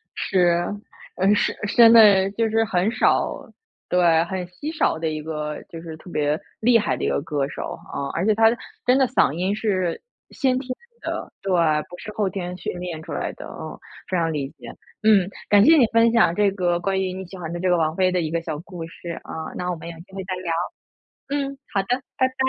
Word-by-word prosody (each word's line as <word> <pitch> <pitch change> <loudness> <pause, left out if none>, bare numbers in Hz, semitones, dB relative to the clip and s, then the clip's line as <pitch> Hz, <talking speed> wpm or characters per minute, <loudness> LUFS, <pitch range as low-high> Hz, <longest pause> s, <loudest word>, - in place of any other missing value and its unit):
是， 175 -2 +2 0.5
嗯， 195 +3 +4
是 - - +1
现 230 +2 +7
在 200 -4 +7
就 225 +2 0
是 225 +1 +2
很 195 +1 +1
少 - - +2 0.6
对， 170 -2 +4
很 185 0 -4
稀 290 - -6
少 300 - +1
的 165 - -1
一 155 -1 -4
个 150 -1 -4
就 165 - -8
是 165 -1 -8
特 180 - -13
别 150 0 0 0.2
厉 230 +1 +5
害 210 - -1
的 - - -5
一 - - +1
个 70 0 0
歌 145 -2 -1
手， - - -5 0.2
啊。 140 - -3
而 175 - -1
且 215 - +4
她 225 - +4 0.4
真 250 +1 +5
的 265 -1 +4
嗓 245 - +3
音 185 +5 -1
是 190 -6 -1 0.3
先 260 -2 +1
天 260 - -9 0.3
的 - - -4
对， 195 - -3 0.4
不 180 - -10
是 215 - -8
后 210 -2 0
天 180 -2 -5
训 180 - -5
练 175 -3 -5
出 - - -9
来 - - -2
的， - - -10
啊 - - -8 0.3
非 185 - 0
常 165 -1 0
理 140 -2 -3
解。 - - -11 0.4
嗯， 205 -4 +5 0.2
感 205 0 +6
谢 320 +1 +7
你 250 - +6
分 230 0 +5
享 220 -7 +4
这 205 0 +3
个 175 -3 0
关 190 +2 0
于 185 -1 -2
你 190 - -6
喜 190 +2 -10
欢 170 -2 -6
的 175 - -4
这 185 +1 0
个 175 - +4
王 155 -1 0
菲 185 0 +2
的 180 -1 +1
一 155 -1 -3
个 165 0 0
小 160 -3 -5
故 175 -1 -8
事， 170 +1 -10
啊。 160 0 -6
那 180 0 -2
我 - - -2
们 165 - -9
有 170 - -8
机 190 +3 -15
会 195 - -5
再 185 -1 -3
聊。 170 - -3 0.8
嗯， 275 -1 -2
好 195 - +2
的， 195 - -15 0.3
拜 260 - +3
拜。 260 - -18
185 Hz, 245 characters per minute, -23 LUFS, 165-215 Hz, 0.8 s, 现